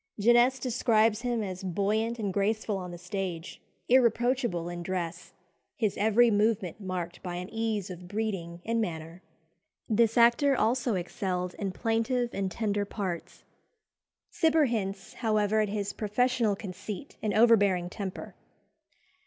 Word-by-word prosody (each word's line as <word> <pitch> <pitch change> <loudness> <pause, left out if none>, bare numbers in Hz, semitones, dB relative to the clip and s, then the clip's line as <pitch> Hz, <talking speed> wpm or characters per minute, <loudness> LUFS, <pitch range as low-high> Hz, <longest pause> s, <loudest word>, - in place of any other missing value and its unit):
Genest 240 +4 +4
describes 225 -3 +2
him 240 -3 -1
as 185 -2 -5
buoyant 210 +5 0
and 205 -4 -2
graceful 210 +1 0
on 180 -2 -5
the 175 - -7
stage, 180 -1 -5 0.3
irreproachable 240 -6 +2
in 175 0 -5
dress, 175 -1 -4 0.4
his 220 -8 0
every 220 +3 +4
movement 210 -3 +1
marked 180 -2 -4
by 180 -2 -5
"an 180 +1 -5
ease 220 -4 -2
of 180 0 -9
breeding 185 -5 -4
and 230 0 +1
manner." 165 -2 -5 0.7
This 230 0 +2
actor 240 +4 +5
also 240 0 +1
excelled 180 0 -3
in 195 -2 -2
plaintive 235 +4 0
and 195 -1 -1
tender 205 -2 -1
parts. 195 -4 -5 0.9
Cibber 320 -1 +3
hints, 195 -4 -3
however, 215 -2 +1
at 210 - 0
his 205 -1 -3
professional 230 0 +1
conceit 200 +3 -7
and 215 - 0
overbearing 205 -6 +4
temper. 190 0 -6
210 Hz, 135 wpm, -29 LUFS, 185-230 Hz, 0.9 s, actor